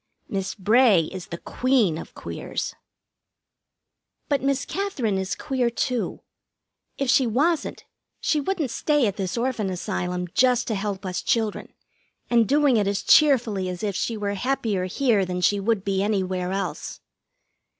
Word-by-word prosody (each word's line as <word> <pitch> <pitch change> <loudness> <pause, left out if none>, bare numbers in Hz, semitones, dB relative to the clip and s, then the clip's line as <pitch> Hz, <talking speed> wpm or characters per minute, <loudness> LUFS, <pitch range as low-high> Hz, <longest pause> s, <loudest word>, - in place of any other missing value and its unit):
Miss 195 -1 -3
Bray 215 -1 +5
is 185 -2 -7
the 170 - -6
Queen 245 -6 +1
of - - -10
Queers. - - -5 1.6
But 285 -2 +1
Miss 275 +1 0
Katherine 275 - -1
is 190 0 -2
queer, 255 -3 -1
too. 240 0 -2 0.8
If 275 - -1
she 255 0 +4
wasn't, 295 +9 0 0.3
she 305 - +1
wouldn't 315 -5 -1
stay 295 +2 +2
at 200 -3 -1
this 190 +1 -3
Orphan 235 -4 -1
Asylum, 180 -1 -3
just 250 -2 +3
to - - 0
help 200 -1 -3
us 185 -1 -2
children, 220 -3 -1 0.6
and 235 -2 +4
doing 285 -2 +4
it 205 -2 +1
as 200 0 -1
cheerfully 230 -11 +4
as 180 +1 -6
if 200 -3 -1
she 230 +3 -1
were 205 -1 -2
happier 215 -4 -1
here 215 +1 +2
than 180 -1 -3
she 200 +3 +2
would 200 -1 0
be 195 -1 0
anywhere 185 -3 -1
else. 195 +1 -4
215 Hz, 150 wpm, -24 LUFS, 190-255 Hz, 1.6 s, Bray